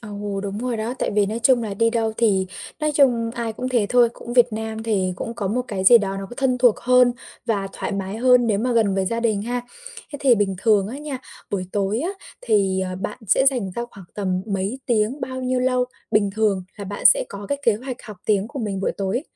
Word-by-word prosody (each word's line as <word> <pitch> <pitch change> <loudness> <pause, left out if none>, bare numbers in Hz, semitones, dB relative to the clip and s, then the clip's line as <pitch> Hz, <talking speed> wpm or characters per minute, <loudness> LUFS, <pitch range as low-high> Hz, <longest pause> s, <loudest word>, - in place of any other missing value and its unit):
Ồ, 205 -2 -5
đúng 200 0 -4
rồi 245 0 -2
đó. 225 +3 -3
Tại - - -1
vì 205 -1 +2
nói 220 +3 -3
chung 245 -1 +4
là 210 -3 -4
đi 230 +3 +2
đâu 225 -2 0
thì 195 -5 +2 0.3
nói 305 0 +1
chung 245 -5 +3
ai 235 -2 -3
cũng 250 +4 -4
thế 240 -5 +1
thôi, 245 -1 +5
cũng 240 - -9
Việt 245 -1 +4
Nam 220 0 -4
thì 195 -5 0
cũng 230 - -5
có 205 -4 -3
một 250 +5 0
cái 190 -2 -3
gì 235 +4 +9
đó 195 -2 -3
nó 195 0 -5
có - - -8
thân 255 -2 +1
thuộc 245 -3 +5
hơn 250 0 +5 0.3
và 200 -4 -1
thoải - - -4
mái 195 +1 -3
hơn 250 0 +4
nếu 210 -3 +1
mà 245 +3 0
gần 220 -4 +2
với 190 -1 0
gia 230 +3 -1
đình 215 -4 0
ha. 245 +3 -2 0.5
Thế 285 - -5
thì 265 -4 +5
bình 200 -3 0
thường 210 -4 +3
á 260 +5 -6
nha, 290 -3 -5 0.3
buổi 185 -2 -2
tối 200 +1 0
á 340 +6 -1 0.3
thì, 195 -4 +1
ờ, 185 -1 -3
bạn 210 - -4
sẽ 265 +8 +4
dành 245 -8 +2
ra 235 +6 -4
khoảng 195 -3 -13
tầm 185 -3 -1
mấy 200 +4 -2
tiếng, 230 +4 +1
bao 260 0 -4
nhiêu 255 0 0
lâu 255 0 +2 0.3
bình 205 -1 +2
thường 210 -4 +1
là 205 - -6
bạn 205 +1 +1
sẽ - - +6
có 200 0 -8
cái 285 - -1
kế 230 - +4
hoạch 250 +3 -6
học 210 -4 -9
tiếng 205 0 +1
của 285 - -7
mình 205 -5 -3
buổi - - 0
tối? 200 +6 -2
220 Hz, 250 wpm, -22 LUFS, 200-245 Hz, 0.5 s, gì